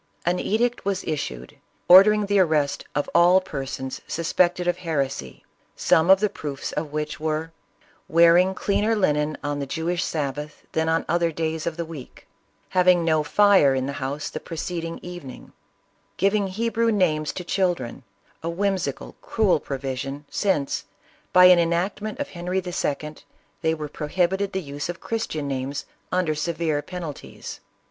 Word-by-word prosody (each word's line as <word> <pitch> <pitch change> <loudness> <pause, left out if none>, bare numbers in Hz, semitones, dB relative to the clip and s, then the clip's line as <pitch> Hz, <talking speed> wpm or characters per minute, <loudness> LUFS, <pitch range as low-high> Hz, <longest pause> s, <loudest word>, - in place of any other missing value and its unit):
An 180 +1 +1
edict 240 +3 0
was 195 -1 -1
issued, 65 - -4 0.3
ordering 205 +3 +8
the 200 0 +2
arrest 155 -5 +1
of 145 - 0
all 175 +2 +6
per 140 -7 -5
sons 130 0 -5
suspected 175 +2 +1
of 175 0 +1
heresy, 140 - -3 0.3
some 160 +1 +3
t>f 190 +1 +8
the 210 +2 +1
proofs 145 -8 -5
of 150 -1 -4
which 150 0 -3
were, 155 +1 -2 0.3
" - - -33
wearing 170 +3 +5
cleaner 205 +4 +1
linen 150 -6 +1
on 145 0 -2
the 140 - -3
Jewish 165 +5 -1
sabbath 150 0 -4
than 160 0 0
on 165 0 +1
other 170 0 +1
days 160 0 -3
of 165 -1 -3
the 170 - -2
week; 155 -6 -10 0.4
having 180 -2 +4
no 155 -2 +3
fire 190 -4 +5
in 130 0 -1
the 140 - -3
house 140 +3 -3
the - - -4
preceding 165 0 -5
evening; 175 -8 -9 0.6
giving 200 +1 +2
Hebrew 230 +3 0
names 155 -7 +1
to 180 - -5
children, 175 -10 -1 0.4
a 165 - -3
whimsical, 185 -5 -2
cruel 210 -8 +2
provision, 135 +1 -5
since, 170 -9 0 0.5
by 180 0 +7
an 180 -1 +8
enactment 185 +7 -1
of 285 0 -4
Henry 180 +1 -3
II., 155 -4 -3 0.4
they 160 -1 +1
were 155 -1 -5
prohibited 180 +7 -1
the 190 -1 -2
use 145 +2 -5
of 175 - -5
Christian 160 -10 -3
names, 135 +1 -3 0.3
under 180 -4 +1
severe 155 -1 -1
penalties." 170 -4 -8
165 Hz, 155 wpm, -24 LUFS, 150-185 Hz, 0.6 s, ordering